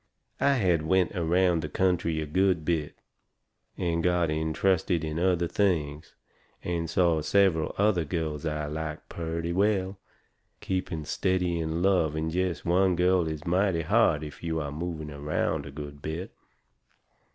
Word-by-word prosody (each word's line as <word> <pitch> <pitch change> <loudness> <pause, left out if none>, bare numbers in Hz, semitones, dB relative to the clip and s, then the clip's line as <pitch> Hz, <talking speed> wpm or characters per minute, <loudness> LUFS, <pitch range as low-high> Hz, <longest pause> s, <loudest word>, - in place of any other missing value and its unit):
I 140 - +4
had 90 - +2
went 90 +4 +1
around 90 0 +2
the 75 - -5
country 90 -2 +1
a - - -3
good 90 +1 +1
bit, 80 -3 -1 0.8
and 85 -1 -1
got 90 -3 +2
intrusted 80 +2 +1
in 80 +1 -3
other 90 -1 +2
things, 80 -7 -1 0.5
and 85 -2 -2
saw 85 -2 +2
several 85 -1 +2
other 100 -4 +2
girls 75 -1 -3
I 75 -2 -2
liked 75 +1 -5
purty 85 0 -3
well. 95 0 +1 0.6
Keeping 90 -4 -3
steady 90 +1 0
in 80 +1 -2
love 90 -6 +2
with 80 +1 -2
jest 90 -2 -1
one 90 +1 +3
girl 90 -1 +2
is 80 +1 -5
mighty 90 -1 +1
hard 75 -1 +3
if 75 - -9
you 80 -1 -2
are 70 -2 -4
moving 80 -1 -5
around 75 0 -2
a - - -8
good 70 0 -8
bit. 80 +5 -5
85 Hz, 150 wpm, -27 LUFS, 80-90 Hz, 0.8 s, I